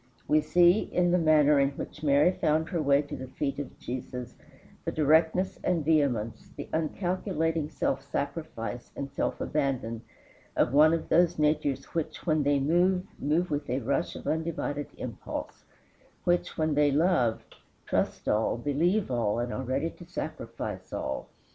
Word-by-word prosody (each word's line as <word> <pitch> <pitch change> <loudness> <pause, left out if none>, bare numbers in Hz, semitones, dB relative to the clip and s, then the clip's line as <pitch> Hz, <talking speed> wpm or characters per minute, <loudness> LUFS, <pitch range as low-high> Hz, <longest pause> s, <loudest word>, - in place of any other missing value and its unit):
We 155 0 +4
see 175 +5 +5
in 175 -4 +1
the 180 - +4
manner 150 -3 +5
in 140 0 +2
which - - -7
Mary 145 +3 +4
found 160 -2 0
her 170 -4 -1
way 140 0 +3
to 145 +1 -7
the 130 - -7
feet 140 +2 -3
of 145 - -6
Jesus 125 0 -6 0.5
the - - -2
directness 160 +5 +2
and 170 -5 +1
vehemence, 125 -8 +1
the - - -6
uncalculating 165 -1 -1
self 135 -3 -1
sacrifice 140 -6 -4
and 140 -1 -5
self 140 - -2
abandon, 130 -6 -1 0.5
of 120 - +2
one 155 +3 +6
of 165 - -5
those 175 +1 +4
natures 150 -3 +1
which, 160 -2 -3
when 155 -3 +2
they 145 0 +2
move, 180 +6 +2
move 155 +5 0
with 145 0 -2
a 125 - 0
rush 140 +7 -1
of - - -9
undivided 155 -2 -2
impulse; 120 -5 -6 0.6
which, 175 0 0
when 155 -1 +1
they 145 0 +4
love, 145 -7 +2 0.4
trust - - -1
all, 110 +2 +1
believe 160 - +1
all, 115 -4 +1
and 120 +1 -2
are - - -3
ready 135 +6 -1
to 175 - -13
sacrifice 175 - -6
all. 65 - -3
150 Hz, 160 wpm, -28 LUFS, 135-165 Hz, 0.6 s, one